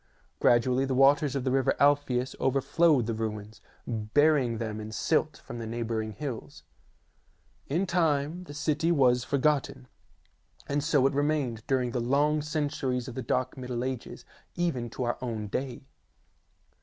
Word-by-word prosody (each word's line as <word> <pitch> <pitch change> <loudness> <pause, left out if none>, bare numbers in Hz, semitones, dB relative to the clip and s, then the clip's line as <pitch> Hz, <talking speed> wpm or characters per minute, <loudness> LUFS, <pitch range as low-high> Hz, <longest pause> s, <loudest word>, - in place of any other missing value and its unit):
Gradually 125 +2 +3
the 135 -1 -1
waters 140 +2 +4
of 135 - -1
the 130 - 0
river 135 -1 +2
Alpheus 140 -3 +2
over 135 +1 +2
flowed 145 -1 +3
the 115 - -2
ruins, 110 -1 -5 0.2
burying 120 +3 +2
them 110 -1 -4
in 105 - -6
the 110 - -9
silt 155 +1 +1
from 120 - -7
the 115 - -5
neighbouring 110 -1 -3
hills. 125 +1 -7 1.0
In 170 +7 0
time 165 -1 0
the 145 - -9
city 155 +2 0
was 125 -6 +3
forgotten, 140 - 0 0.8
and 145 0 -1
so 150 -4 +3
it 135 - +2
remained 145 -5 0
during 130 -2 +1
the 125 - -1
long 145 +5 +2
centuries 145 -5 -2
of 130 - -6
the 130 - -4
dark 125 +1 -1
Middle 125 -1 -4
Ages, 130 -2 -5 0.3
even 135 -9 -1
to 125 - -4
our 120 0 -1
own 115 -4 -3
day. 130 +2 -4
130 Hz, 155 wpm, -28 LUFS, 120-145 Hz, 1.0 s, waters